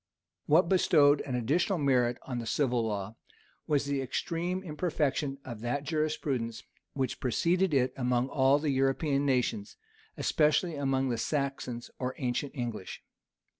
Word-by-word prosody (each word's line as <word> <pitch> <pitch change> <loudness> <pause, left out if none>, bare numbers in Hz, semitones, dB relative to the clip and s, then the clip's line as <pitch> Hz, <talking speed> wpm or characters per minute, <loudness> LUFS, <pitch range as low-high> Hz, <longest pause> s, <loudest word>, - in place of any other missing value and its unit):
What 165 +4 +5
bestowed 150 -5 +4
an 130 - -2
additional 155 - +1
merit 125 -5 +2
on 125 -2 -4
the 115 - -5
civil 120 0 +1
law, 105 -1 -3 0.5
was 145 -2 +1
the 140 -1 -1
extreme 170 +7 -2
imperfection 150 -4 -1
of 120 -5 -7
that 125 +4 -2
jurisprudence 145 -6 -2 0.3
which 130 -3 -2
preceded 170 +9 +1
it 130 -3 +2
among 125 -1 +1
all 135 0 +4
the 150 0 -1
European 135 +2 +1
nations, 140 - 0 0.4
especially 155 +3 +2
among 135 -2 0
the 120 -2 -1
Saxons 135 -4 -3
or 130 0 -3
ancient 130 +1 -2
English. 120 -7 -5
135 Hz, 135 wpm, -30 LUFS, 125-150 Hz, 0.5 s, What